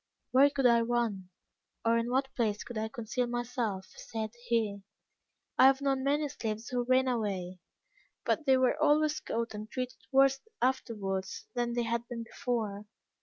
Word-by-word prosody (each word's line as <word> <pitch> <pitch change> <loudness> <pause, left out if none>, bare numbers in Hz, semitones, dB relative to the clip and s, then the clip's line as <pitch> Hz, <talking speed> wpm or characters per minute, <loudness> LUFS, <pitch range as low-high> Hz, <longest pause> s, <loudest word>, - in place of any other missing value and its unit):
"Where 275 +2 +6
could 280 -2 -1
I 235 -1 +6
run, 230 -6 -1 0.6
or 230 0 +4
in 230 +1 0
what 265 +1 0
place 215 -4 0
could 240 - -9
I 220 0 -1
conceal 240 +1 -2
myself?" 240 -5 -2
said 220 -2 -4 0.2
he. 215 -4 0 0.8
"I 260 - +9
have 270 0 +4
known 270 -2 0
many 290 +2 +2
slaves 220 -4 -4
who 245 -1 -1
ran 255 +1 +3
away, 195 -7 -2 0.7
but 305 - 0
they 265 -1 +6
were 260 +4 +2
always 305 0 +3
caught 230 -5 -3
and 210 +1 -7
treated 255 0 -4
worse 270 0 +5 0.2
afterwards 205 -7 -1
than 240 -1 -1
they 240 0 0
had 235 +1 -2
been 235 -2 -5
before. 225 -5 -3
240 Hz, 165 wpm, -31 LUFS, 220-260 Hz, 0.8 s, I